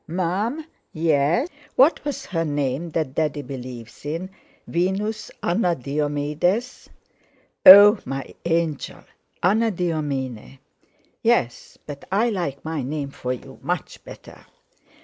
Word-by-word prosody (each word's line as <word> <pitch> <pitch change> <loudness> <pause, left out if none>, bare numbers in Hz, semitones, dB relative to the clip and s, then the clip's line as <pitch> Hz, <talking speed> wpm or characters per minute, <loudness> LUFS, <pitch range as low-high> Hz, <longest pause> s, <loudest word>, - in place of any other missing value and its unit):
Mum?" 190 - -2 0.3
"Yes?" 160 - +2 0.3
"What 275 +6 +4
was 285 -2 -4
her 165 -4 -2
name 145 +1 -2
that 155 -4 -2
Daddy 150 -1 -1
believes 125 -3 -9
in? 165 +6 -4 0.3
Venus 200 +5 -2
Anna 175 -1 +1
Diomedes?" 150 - -2 0.8
"Oh! 205 +3 +11
my 135 -1 -6
angel! 165 -3 -2 0.4
Anadyomene." 160 - -1 0.6
"Yes! 225 - 0
but 145 -2 -9
I 220 +5 +2
like 155 -9 -4
my 160 -2 -2
name 140 +1 -4
for 125 -2 -4
you 125 - -8
much - - -4
better." - - -13
160 Hz, 110 wpm, -23 LUFS, 140-195 Hz, 0.8 s, Oh